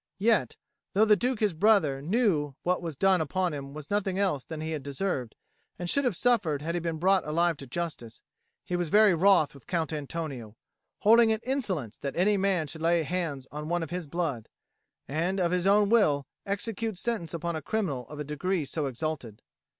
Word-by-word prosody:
Yet, 220 +1 +2 0.4
though 210 +3 +5
the 210 -1 +6
Duke 245 +2 -1
his 210 -4 +2
brother 160 -7 +3
knew 180 - +1
that 140 - -17
what 180 0 +1
was 165 -4 -5
done 190 +3 +3
upon 175 +3 -1
him 140 -1 -6
was 150 +2 -9
nothing 195 -2 0
else 185 -10 0
than 160 -2 -7
he 160 +1 -4
had 155 -3 -3
deserved 140 - -3 0.4
and 175 - -4
should 280 +9 +2
have 240 -7 +1
suffered 185 - +1
had 165 +2 -2
he 175 - 0
been 165 -1 -3
brought 185 +2 +3
alive 170 +2 +1
to 135 - -9
justice, 145 -5 -5 0.5
he 180 - -2
was 175 -2 -1
very 210 +1 +6
wroth 170 -3 +4
with 140 -3 -16
Count 165 -3 -1
Antonio, 140 -7 -5 0.5
holding 230 +2 +6
it 220 0 0
insolence 195 - -2
that 140 - -4
any 200 +4 +3
man 190 -4 +1
should 160 +2 -8
lay 165 0 +3
hands 160 -5 -3
on 150 +1 -6
one 175 -1 0
of 160 - -7
his 180 -3 -4
blood, 145 -8 -3 0.6
and, 170 +7 -1
of 175 -2 +1
his 180 +1 +1
own 205 +1 +5
will, 155 -11 +3 0.2
execute 215 +1 -2
sentence 185 -6 -2
upon 170 0 -3
a 160 - -3
criminal 150 - -2
of 150 - -8
a - - -2
degree 150 +3 -2
so 150 +1 -2
exalted. 130 -5 -5
170 Hz, 205 wpm, -28 LUFS, 150-195 Hz, 0.6 s, the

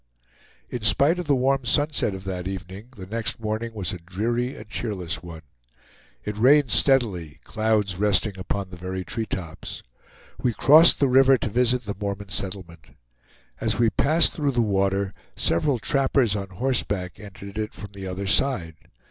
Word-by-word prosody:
In 125 - -4
spite 140 +10 +3
of 175 - -5
the 140 - +4
warm 135 +1 +1
sunset 145 -4 +1
of 95 - -9
that 95 -2 -4
evening 95 +3 -7
the 95 - -8
next 115 +4 -2
morning 110 +1 -3
was 100 -1 -3
a 90 - -6
dreary 115 +9 -2
and 105 - -11
cheerless 100 -5 -4
one. 85 -2 -10 0.8
It 105 0 -4
rained 135 +1 +5
steadily, 95 - +2
clouds 110 -4 0
resting 105 0 +2
upon 95 +1 -4
the 90 - -9
very 95 +1 -5
treetops. 95 -8 -5 0.6
We 120 - +1
crossed 160 +4 +7
the 140 - +3
river 135 +1 +5
to 115 - -3
visit 125 +2 +1
the 100 - -3
Mormon 100 0 -4
settlement. 95 -3 -4 0.7
As - - 0
we 115 -2 +3
passed 160 +4 +3
through 145 -3 -1
the 120 -1 +2
water, 100 -1 0 0.2
several 125 - +1
trappers 130 -2 +1
on 100 -1 -4
horseback 100 -3 -2
entered 100 0 -9
it 110 0 -4
from 100 -1 -9
the 95 -1 -7
other 95 +2 -4
side. 100 - +1
105 Hz, 165 wpm, -24 LUFS, 95-125 Hz, 0.8 s, crossed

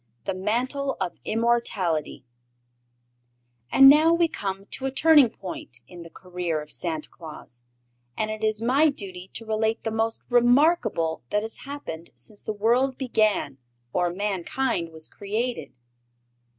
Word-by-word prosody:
The - - -2
Mantle 250 +8 -1
of 175 - -2
Immortality 215 - 0 1.5
And 270 - +8
now 305 +4 +7
we 335 0 +3
come 195 -8 -5
to 270 - -2
a - - -2
turning 295 -2 +6
point 175 - -8
in 175 -1 -11
the 170 - -10
career 180 -3 -4
of 150 0 -10
Santa 160 -3 -2
Claus, 150 -7 -11 0.6
and 215 0 -1
it 215 0 -6
is 215 0 +1
my 275 +6 +4
duty 190 -8 -7
to 225 - -6
relate 220 +1 -1
the 225 - -2
most 225 +1 -2
remarkable 245 - +3
that 210 0 0
has 225 - -3
happened 170 - -7
since 165 - -7
the - - -4
world 240 +5 +1
began 215 - 0 0.3
or 180 -1 +1
mankind 195 +1 -2
was 160 0 -9
created. 215 - -3
215 Hz, 140 wpm, -25 LUFS, 180-250 Hz, 1.5 s, And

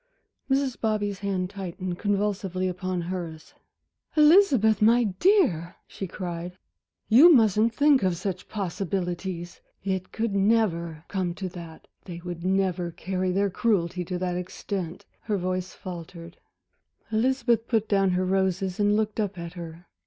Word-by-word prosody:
Mrs. 270 -2 0
Bobby's 205 -3 -1
hand 190 -2 -2
tightened 185 -2 -5
convulsively 200 -3 -1
upon 185 0 -3
hers. 170 -3 -6 0.6
"Elizabeth, 300 - +5
my 235 +3 +5
dear," 195 - +2
she 195 - -6
cried, 175 0 -6 0.5
"you 275 +11 +8
mustn't 225 - +4
think 290 -3 +4
of 185 -3 +1
such 185 +1 -4
possibilities. 180 -2 -3 0.2
It 190 -1 -2
could 225 -2 -2
never 195 -6 +1
come 185 -3 -2
to 190 - -4
that, 170 -2 -11 0.2
they 175 -2 -8
would 175 -1 -6
never 185 -2 0
carry 185 +2 -2
their 200 +1 +1
cruelty 180 -5 0
to 180 +1 -3
that 180 -1 -2
extent" 180 -1 -5
Her 210 - -2
voice 185 0 -3
faltered. 170 -1 -9 0.7
Elizabeth 235 0 +1
put 225 -2 +1
down 195 -2 +3
her 185 0 +1
roses 190 0 0
and 205 0 +3
looked 215 0 -1
up 205 -3 -1
at 170 0 -6
her. 170 -1 -9
190 Hz, 140 wpm, -26 LUFS, 180-215 Hz, 0.7 s, you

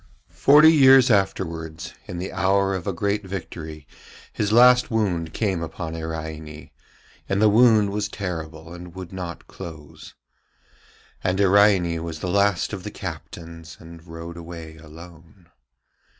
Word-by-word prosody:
Forty 150 +3 +6
years 135 -3 +6
afterwards, 85 -5 -2
in 90 - -6
the 90 +2 -5
hour 95 +1 +1
of 95 -1 -5
a - - +1
great 100 +3 -2
victory, 80 -5 -8 0.5
his 105 -1 -1
last 125 +2 +6
wound 90 -8 -1
came 95 -6 -1
upon 80 0 -6
Iraine, 80 -1 -7 0.6
and 95 - 0
the 110 - +5
wound 110 -2 +4
was 105 +1 -2
terrible 80 -4 -6
and 90 0 -11
would 95 -1 -9
not 90 -3 -7
close. 80 -6 -11 1.1
And 95 +1 0
Iraine 95 -4 +3
was 80 -2 -6
the 90 - -4
last 100 0 +1
of 100 - -5
the - - -5
captains, 85 -1 -9
and 80 0 -13
rode 85 +1 -9
away 85 -2 -9
alone. 85 +2 -15
90 Hz, 135 wpm, -23 LUFS, 80-100 Hz, 1.1 s, Forty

